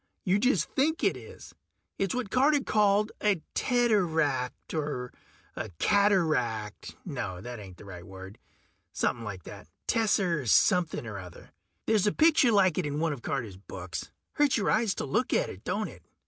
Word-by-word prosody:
You 190 +2 +2
just 205 - +1
think 315 +4 +1
it - - +3
is. - - -12 0.5
It's 195 +1 0
what 245 -6 -3
Carter 285 +2 +3
called 210 -1 +2
a 200 -7 +1
teteract, 165 - +1
or 145 -5 -3 0.4
a - - -4
cataract... 155 - +1
no, 125 - -4
that 120 +4 -7
ain't 95 -3 -11
the - - -13
right 90 -3 -9
word. 95 +2 -11 0.5
Somepin' 115 - -1
like 100 -5 -6
that - - -11 0.2
tesser 185 - +1
something 175 - +3
or 105 -3 -6
other. 90 -3 -12 0.3
There's 215 -2 +2
a - - +4
picture 310 -4 +4
like 190 -5 +3
it 170 - -1
in 145 +1 -3
one 160 -1 +1
of 135 - -8
Carter's 115 -9 -3
books. 90 -4 -7 0.2
Hurts 290 -4 +2
your 210 - +1
eyes 215 -2 +2
to - - -3
look 195 - 0
at - - +1
it, - - -12
don't - - -1
it? - - -12
165 Hz, 170 wpm, -28 LUFS, -, 0.5 s, a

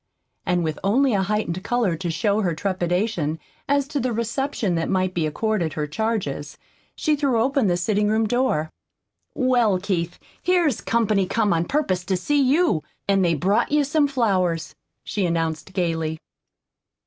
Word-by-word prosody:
And 180 -1 +2
with 155 -1 -2
only 250 +6 +3
a 195 - +2
heightened 190 -3 -1
color 235 -8 +1
to 170 +2 -4
show 205 +5 +1
her 175 -5 0
trepidation 180 -2 -1 0.3
as 280 -1 +2
to 295 -2 -1
the 255 -1 -1
reception 235 -2 -1
that 165 -1 -1
might 185 -1 +1
be 165 -3 0
accorded 180 0 -1
her 150 - -2
charges, 150 -5 -3 0.4
she 305 -2 +1
threw 275 -5 +1
open 265 0 +2
the 175 -1 +2
sitting 205 +3 +1
room 220 +1 +2
door. 240 -10 0 0.6
"Well, 245 -7 +2
Keith, 180 -3 -2 0.2
here's 345 - +2
company 215 -4 +1
come 210 -3 +1
on 165 0 +1
purpose 190 - 0
to 190 -1 0
see 290 +10 +1
you. 275 - +3 0.3
An' 195 -1 +3
they've 170 -4 +1
brought 195 - +1
you 300 0 +3
some 290 +1 +2
flowers," 185 - 0 0.3
she 200 -4 -1
announced 165 0 -2
gayly. 165 -3 -1
200 Hz, 160 wpm, -23 LUFS, 170-245 Hz, 0.6 s, only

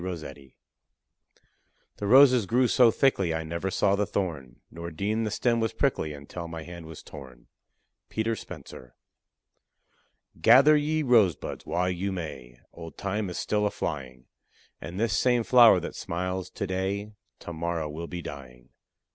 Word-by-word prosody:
ROSSETTI. 75 -7 -8 1.4
The 100 - -4
roses 125 -2 +6
grew 125 +4 +3
so 120 0 +5
thickly, 100 -9 +1
I 80 - -3
never 85 +4 -3
saw 100 +1 +2
the 100 0 -1
thorn, 80 -10 -4
Nor 85 0 -7
deemed 105 +7 -2
the - - -1
stem 115 +2 0
was 115 -1 -1
prickly 75 - 0
until 75 +4 -8
my 80 -1 -7
hand 85 -1 -10
was 80 -1 -10
torn. 65 -4 -12 0.6
PETER 110 +1 -1
SPENCER. 65 - -11 1.5
Gather 135 - +7
ye 155 +1 0
rosebuds 110 - +2
while 90 +1 0
you 95 +2 -3
may, 70 -9 -7 0.2
Old 80 -3 -10
Time 100 0 -2
is 90 - -6
still 105 0 0
a - - 0
flying; 65 -8 -5 0.6
And 85 +3 -7
this 110 -3 +1
same 125 +2 +2
flower 115 -6 +7
that - - -6
smiles 90 +1 -4
to 100 - -5
day 95 +3 -3 0.3
To 85 - -7
morrow 85 -1 -3
will 80 +3 -6
be 85 -1 -6
dying. 65 -4 -10
90 Hz, 155 wpm, -27 LUFS, 80-110 Hz, 1.5 s, Gather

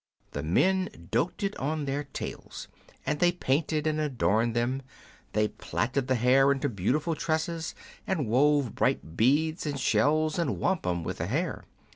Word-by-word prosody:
The 70 - -3
men 170 - +1
doted 180 - 0
on 150 +2 -2
their 140 +1 -2
tails, 135 - -7 0.4
and 150 -1 -1
they 175 0 +5
painted 155 -1 0
and 155 0 +1
adorned 120 -6 +1
them; 125 +3 0 0.5
they 105 0 +2
platted 130 +2 -2
the 130 - +2
hair 130 +3 +5
into 140 +1 0
beautiful 125 - 0
tresses, 160 +1 -2 0.3
and 175 -8 0
wove 140 +1 +3
bright 80 - 0
beads 155 - +2
and 145 -2 -2
shells 150 +9 +2
and 170 - 0
wampum 90 - 0
with - - -4
the - - -1
hair. - - -2
140 Hz, 150 wpm, -28 LUFS, 120-155 Hz, 0.5 s, they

